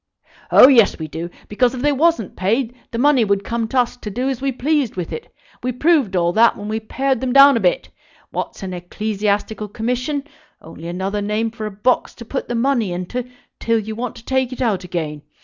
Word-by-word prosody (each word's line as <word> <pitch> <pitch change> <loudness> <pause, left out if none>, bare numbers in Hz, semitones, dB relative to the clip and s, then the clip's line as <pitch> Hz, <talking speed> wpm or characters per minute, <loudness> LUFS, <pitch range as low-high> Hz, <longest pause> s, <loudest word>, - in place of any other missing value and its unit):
"Oh - - +9
yes, 235 -7 +5
we 160 - -5
do; 165 +3 -6 0.2
because, 245 +4 +1
if 250 - -5
they 295 - +3
wasn't 290 - +1
paid, 225 +6 0 0.2
the 230 - -5
money 275 -1 +4
would 200 -1 +1
come 230 +1 -2
to 255 +3 +1
us 245 0 -4
to 220 - -7
do 250 +6 -2
as 260 -2 -3
we 275 0 0
pleased 275 0 0
with 180 -2 -4
it. 465 - -7 0.3
We 255 - -1
proved 270 - +2
all 175 -1 +2
that 230 +3 +4
when 205 - -7
we 220 +1 -2
pared 260 +3 -1
them 255 -2 -1
down 275 +1 +8
a - - +2
bit. - - +1 0.4
What's - - -5
an 185 -1 -4
Ecclesiastical 210 +3 -2
Commission? 250 +7 -2 0.4
Only 165 +1 -10
another 190 +4 -2
name 215 +2 -1
for 220 -1 -5
a - - -6
box 210 +6 0
to 235 - -10
put 265 +4 -4
the 240 - -3
money 235 -5 +1
into 210 +8 -4 0.3
till 230 0 +1
you 220 0 -4
want 240 +1 -4
to 235 - -13
take 260 -1 0
it 255 - -7
out 215 -7 0
again. 155 -4 -4
230 Hz, 220 wpm, -20 LUFS, 200-260 Hz, 0.4 s, Oh